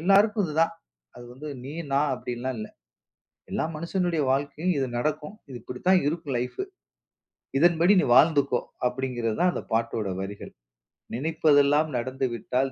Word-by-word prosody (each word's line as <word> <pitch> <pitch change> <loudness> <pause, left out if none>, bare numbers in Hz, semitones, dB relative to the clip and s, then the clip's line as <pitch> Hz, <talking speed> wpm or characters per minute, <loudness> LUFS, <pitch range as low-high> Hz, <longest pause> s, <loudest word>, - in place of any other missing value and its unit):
எல்லாருக்கும் 200 +4 +4
இது 155 - -6
தான். 165 - +1 0.4
அது 120 - -10
வந்து 145 +5 -8 0.2
நீ, 135 - -6 0.2
நான் 140 +1 +2
அப்டின்லாம் 125 0 -4
இல்ல. 110 - -6 0.8
எல்லா - - -1
மனுஷனுடைய 170 0 -1
வாழ்க்கையில 145 +6 -1
இது 135 - 0
நடக்கும். 150 - -2 0.2
இது 125 - -7
இப்டித்தான் 180 +9 +1
இருக்கும் 155 -4 -3
லைஃப். 125 - -4 1.0
"இதன்படி 170 +3 +5
நீ - - +1
வாழ்ந்துக்கோ!" 140 -4 +4 0.3
அப்டிங்கிறதுதான் 125 +5 -1
அந்த - - -4
பாட்டோட 115 -2 0
வரிகள். 100 +1 -7 0.6
"நினைப்பதெல்லாம் 150 +1 +3
நடந்துவிட்டால் 130 +1 -1
140 Hz, 125 wpm, -26 LUFS, 125-165 Hz, 1.0 s, இதன்படி